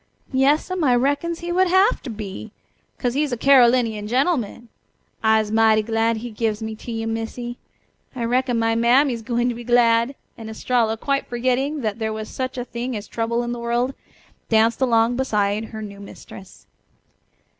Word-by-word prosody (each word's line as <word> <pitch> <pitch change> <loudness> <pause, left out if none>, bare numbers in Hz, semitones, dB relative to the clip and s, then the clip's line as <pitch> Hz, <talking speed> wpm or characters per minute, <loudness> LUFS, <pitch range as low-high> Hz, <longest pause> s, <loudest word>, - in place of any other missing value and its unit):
"Yas'm, 300 +7 +2
I 255 -4 +4
reckons 285 +7 0
he 345 0 -4
would 370 +1 +3
hafter 375 - +2
be, 215 -1 -7 0.5
'cos 245 -2 -1
he's 290 +1 0
a 245 - -1
Carolinian 240 -5 +4
gen'man. 245 - 0 0.5
I'se 220 -1 +2
mighty 220 -1 +4
glad 225 +1 0
he 240 +2 -6
gives 215 -1 -1
me 220 0 -4
to 235 - -8
you, 225 0 -3
Missy. 225 +2 -4 0.6
I 240 - -3
reckon 245 +1 +1
my 225 0 +1
mammy's 240 +2 +3
gwine 240 +1 0
to - - -1
be 240 +1 -8
glad," 235 +1 +3 0.2
and 220 -1 -7
Estralla, 225 0 0
quite 275 +4 -1
forgetting 255 +5 -1
that 215 -1 -3
there 220 -1 -1
was 215 0 -5
such 260 0 -4
a 245 - -3
thing 240 0 -4
as 205 0 -8
trouble 235 +1 -1
in 240 - -3
the 240 - -4
world, 240 +3 -1 0.6
danced 225 +2 +3
along 235 -1 +3
beside 210 -4 0
her 220 -1 -8
new 200 -1 -9
mistress. 195 -1 -12
235 Hz, 170 wpm, -22 LUFS, 225-255 Hz, 0.6 s, I